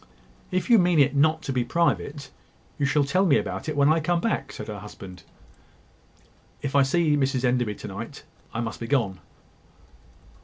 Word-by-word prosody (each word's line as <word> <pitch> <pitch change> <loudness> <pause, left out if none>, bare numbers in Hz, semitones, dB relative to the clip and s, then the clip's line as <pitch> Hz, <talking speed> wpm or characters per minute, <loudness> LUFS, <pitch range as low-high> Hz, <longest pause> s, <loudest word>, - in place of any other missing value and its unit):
"If 185 -1 -1
you 235 -3 +6
mean 175 -2 +3
it 140 0 +4
not 155 +2 +2
to 135 - -3
be 125 -1 +1
private, 145 0 -1 0.5
you 140 - +2
shall 150 +1 +2
tell 180 +8 +1
me 160 -7 +4
about - - -4
it 150 - -4
when 145 +2 +5
I 165 - +1
come 170 +2 0
back," 145 -9 -2
said 105 - -8
her 105 -2 -6
husband. 95 -3 -11 1.4
"If 140 0 -3
I 140 - +6
see 150 +2 +2
Mrs 135 -2 0
Enderby 125 -4 +1
to - - -9
night, - - -8 0.3
I 115 - -3
must 115 -2 -5
be 115 - -5
gone." 115 -9 0
140 Hz, 185 wpm, -25 LUFS, 125-160 Hz, 1.4 s, you